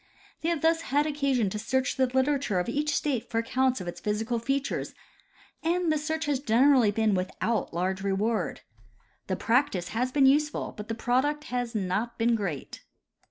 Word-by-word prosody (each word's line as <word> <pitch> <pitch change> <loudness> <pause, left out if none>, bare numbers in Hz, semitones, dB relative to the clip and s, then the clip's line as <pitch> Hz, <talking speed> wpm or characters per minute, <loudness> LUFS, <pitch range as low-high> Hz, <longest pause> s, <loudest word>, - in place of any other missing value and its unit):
They 325 - 0
have 330 -3 -1
thus 325 0 +3
had 290 -1 +1
occasion 275 -8 0
to 210 - -3
search 260 +4 0
the 260 -1 +2
literature 265 -4 +1
of 180 - -2
each 295 +4 0
state 270 -6 -1
for 225 - -2
accounts 255 +2 +1
of 180 - -7
its 175 - -6
physical 220 +3 -1
features, 275 +4 -2 0.7
and 345 0 +1
the 310 - +2
search 315 +2 -2
has 290 -3 0
generally 255 -1 +4
been 215 0 +1
without 190 +5 -1
large 185 +3 -1
reward. 200 +3 -1 0.7
The - - 0
practice 225 -7 +1
has 250 +3 -1
been 275 0 +4
useful, 295 +3 +2
but 210 0 -8
the 225 - -3
product 265 +6 0
has 245 -1 -2
not 210 +4 -1
been 235 +1 +2
great. 195 -11 -3
245 Hz, 175 wpm, -27 LUFS, 215-285 Hz, 0.7 s, generally